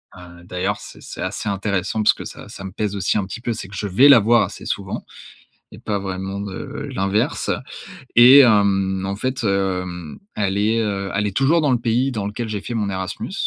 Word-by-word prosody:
Heu, 85 -1 -13
d'ailleurs 90 +3 -2
c'est - - -12
c'est - - -8
assez 110 - -3
intéressant 100 +1 -1
parce - - +5
que - - -9
ça - - -9
ça - - -10
me 95 - -6
pèse 105 0 -3
aussi 95 0 0
un 100 - 0
petit 105 +5 -8
peu, 120 - -2
c'est 105 -3 -7
que 100 - -11
je 105 - -3
vais 105 +9 +5
la 140 - +9
voir 115 +2 +4
assez - - -7
souvent - - -4 0.7
et - - -11
pas 105 -2 -2
vraiment, 95 +1 -4
heu, 145 +8 -6
l'inverse. 100 -5 -1 0.7
Et, 125 +4 +9
hem, 100 -5 +3
en 95 +1 -3
fait, 130 +3 -3
heu, 95 -2 0 0.5
elle 100 -1 0
est, 110 +3 +2
heu, 100 -3 -2
elle 100 +1 0
est 100 - -4
toujours 155 +5 +3
dans 145 -3 +2
le 125 - +2
pays 120 +3 0
dans 105 -4 -3
lequel 110 +3 -4
j'ai 105 -2 -3
fait 120 - -6
mon 105 -3 -1
Erasmus, 95 -1 -4
100 Hz, 220 wpm, -21 LUFS, 95-115 Hz, 0.7 s, la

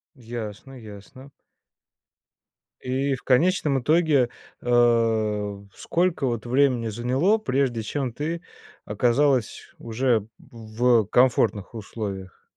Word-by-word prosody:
Ясно, 120 +1 -8
ясно. 110 +5 -13 1.5
И 135 +2 -1
в - - -14
конечном 140 -1 +2
итоге, 150 -5 +3 0.3
э, 115 -4 +1 0.2
сколько 170 -4 -1
вот 120 -1 -3
времени 125 -2 +2
заняло, 130 - +1
прежде 130 - -1
чем 130 +3 -3
ты 165 +5 -4 0.4
оказалась 125 +3 0
уже 115 -2 0
в 115 -4 -14 0.3
в - - -12
комфортных 115 -3 +1
условиях? 100 -4 -7
120 Hz, 95 wpm, -24 LUFS, 110-135 Hz, 1.5 s, итоге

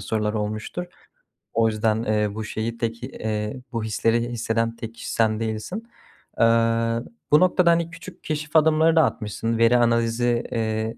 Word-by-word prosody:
sorular 105 +1 -1
olmuştur. 110 +10 -3 0.7
O 115 0 +3
yüzden, 110 0 0
eee, 105 -2 0
bu 110 - -4
şeyi 110 +2 -4
tek 115 0 -3
eee, 110 -1 -4
bu 115 -2 -2
hisleri 115 +2 0
hisseden 115 -1 -1
tek 115 -1 -7
kişi - - -6
sen 110 -1 +2
değilsin. 110 - -4 0.6
Eee, - - +5 0.9
bu 150 - +7
noktada, 180 -1 +4
hani, 170 0 +1
küçük 170 +2 -12
keşif 150 0 -4
adımları 160 +1 +5
da 160 - +6
atmışsın, 115 -2 -2
veri 115 +2 +5
analizi, 120 0 +2
eee, 110 0 -2
115 Hz, 155 wpm, -23 LUFS, 110-125 Hz, 0.9 s, bu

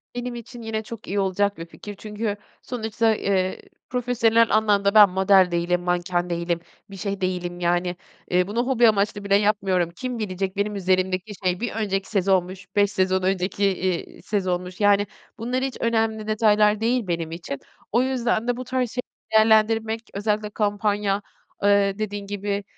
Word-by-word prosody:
Benim 245 0 -4
için 240 +1 -9
yine 220 -1 -3
çok 225 0 -9
iyi 200 +2 -1
olacak 200 +1 +1
bir 165 - -6
fikir. 205 +4 -10
Çünkü 210 +1 -4 0.3
sonuçta, 225 -2 0
eee, 190 -2 0 0.3
profesyonel 230 -2 +2
anlamda 205 -2 +3
ben 210 -2 +9
model 190 0 +4
değilim, 175 +1 0
manken 175 0 -1
değilim, 170 0 -1 0.3
bir 195 - -9
şey 200 0 -4
değilim, 180 -1 -2
yani, 175 +1 0 0.4
eee, 180 0 +3
bunu 235 +4 -1
hobi 245 -3 +4
amaçlı 205 0 0
bile 200 0 +3
yapmıyorum. 200 -4 +2
Kim 250 +2 -4
bilecek 190 -2 -3
benim 205 +1 -1
üzerimdeki 185 +1 0
şey, 180 -1 +1
1 240 -1 -2
önceki 200 -3 -2
sezonmuş, 190 -2 0
5 205 -1 +3
sezon 190 -1 +1
önceki, 190 +1 0
iii, 185 -2 -1
sezonmuş? 185 -3 -2
Yani, 205 0 +4 0.3
bunlar 250 +3 -2
hiç 265 -2 -3
önemli 220 -2 0
detaylar 215 -1 +3
değil 235 -1 +1
benim 165 -2 -2
için. 165 -5 -6 0.3
O 235 - +3
yüzden 245 -3 0
de 245 -1 0
bu 255 - -4
tarz 255 -1 -1
şeyleri 250 - -8
değerlendirmek, 220 +1 +3
özellikle 210 +1 -1
kampanya, 205 -1 0 0.4
eee, 200 0 +3
dediğin 205 -1 -4
gibi, 205 0 -3
205 Hz, 160 wpm, -24 LUFS, 185-220 Hz, 0.4 s, ben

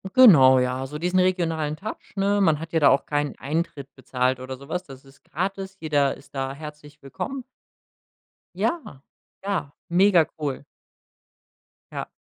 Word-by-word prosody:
Genau, 135 - +8
ja, 125 +1 0
also 140 +3 -6
diesen 180 +2 +1
regionalen 165 -5 +1
Touch, 200 +6 -8
ne? 200 +1 +2
Man 160 -6 +3
hat 165 +1 -8
ja 165 - +2
da 145 - +6
auch 135 - +2
keinen 145 -1 -1
Eintritt 145 -2 -3
bezahlt 130 0 -1
oder 130 +1 -6
so 140 +2 -14
was. 180 +2 -2
Das 135 -6 -13
ist 135 0 -20
gratis. 190 +3 -4
Jeder 145 -3 +1
ist 140 - -18
da 135 0 -2
herzlich 150 0 -11
willkommen. 260 - -5 1.1
Ja, 225 - -2 0.4
ja, 195 -7 -2 0.2
mega 180 -1 +5
cool. 145 -3 -3 1.3
Ja. - - -5
150 Hz, 150 wpm, -24 LUFS, 135-185 Hz, 1.3 s, Genau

